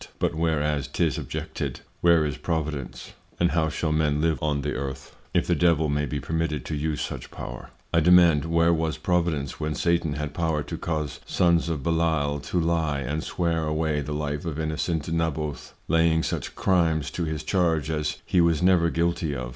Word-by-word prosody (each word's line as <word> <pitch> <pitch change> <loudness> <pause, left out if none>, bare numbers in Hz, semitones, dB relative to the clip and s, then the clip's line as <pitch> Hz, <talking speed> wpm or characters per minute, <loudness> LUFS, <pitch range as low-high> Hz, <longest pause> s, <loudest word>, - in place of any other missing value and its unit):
But - - 0
whereas 75 -3 0
'tis 80 -6 0
objected; - - -5 0.2
where 85 -2 +5
is 75 -3 -2
Providence? 75 -5 -4 0.3
And 85 0 +3
how 80 -1 +1
shall 80 +1 -2
Men 75 -1 +1
live 80 -4 +1
on 75 -2 0
the 75 +1 -2
Earth, 65 0 -5 0.2
if - - +2
the - - +2
Devil 80 -3 +3
may 75 0 0
be 70 +3 -3
permitted 80 -3 -2
to 80 - -3
use 75 +1 -2
such - - -5
Power? - - -8 0.2
I 85 - +5
demand, 85 -2 +6
where 85 +1 +3
was 80 -1 -1
Providence, 85 -4 -1
when 75 -1 -2
Satan 85 -1 +1
had 75 0 -4
Power 80 -2 0
to - - -6
cause 75 -3 -3
Sons 85 -1 +2
of 75 -5 -2
Belial 80 -3 +1
to 90 - 0
lye 80 -4 0
and 75 +5 -2
swear 85 -2 -1
away 75 -1 0
the 75 +2 -5
Life 75 -1 -2
of 80 -2 -4
innocent 80 0 -1
Naboth, 80 -3 -2
laying 80 0 +3
such - - -3
Crimes 80 -6 +1
to 85 - -2
his 80 -1 -3
charge 80 -5 +1
as 75 -1 -1
he 90 - +3
was 85 -1 +2
never 90 -2 +4
guilty 85 -2 0
of? 60 -2 -4
80 Hz, 185 wpm, -25 LUFS, 75-85 Hz, 0.3 s, demand